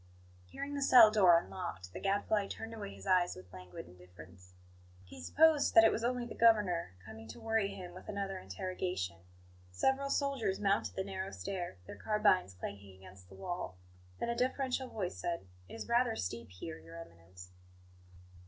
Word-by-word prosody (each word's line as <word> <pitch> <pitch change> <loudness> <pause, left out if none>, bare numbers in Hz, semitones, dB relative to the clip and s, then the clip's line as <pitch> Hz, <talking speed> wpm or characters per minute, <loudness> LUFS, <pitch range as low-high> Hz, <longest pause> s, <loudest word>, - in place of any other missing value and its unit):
HEARING 280 - -6
the 285 - -3
cell 240 -5 +8
door 185 -6 +6
unlocked, 100 - -5
the - - -6
Gadfly 200 +1 +1
turned 225 +3 -7
away 210 - -7
his 95 0 -12
eyes 180 -1 +3
with 90 0 -13
languid 90 -1 -9
indifference. 90 0 -15 0.5
He 90 -1 -12
supposed 305 - +4
that 225 - +10
it 225 - +6
was 230 - -2
only 245 0 0
the 235 - -7
Governor, 205 - +3
coming 110 +1 -10
to 110 +2 -10
worry 225 -2 +1
him 180 -3 -8
with 185 - -11
another 195 -2 -3
interrogation. 95 - -4 0.5
Several 265 - +1
soldiers 270 -10 0
mounted 200 0 +1
the 190 - -1
narrow 190 0 -4
stair, 185 - -5
their - - -9
carbines 200 - +2
clanking 100 +1 -8
against 95 -1 -15
the 95 - -13
wall; 95 - -5 0.4
then - - -2
a 235 - 0
deferential 260 +1 0
voice 185 -5 -4
said: 170 - -3 0.2
"It - - -8
is 225 - -6
rather 235 0 +2
steep 115 +5 -4
here, 85 -3 -8
Your 80 +1 -12
Eminence." 85 +2 -12
185 Hz, 170 wpm, -34 LUFS, -, 0.5 s, that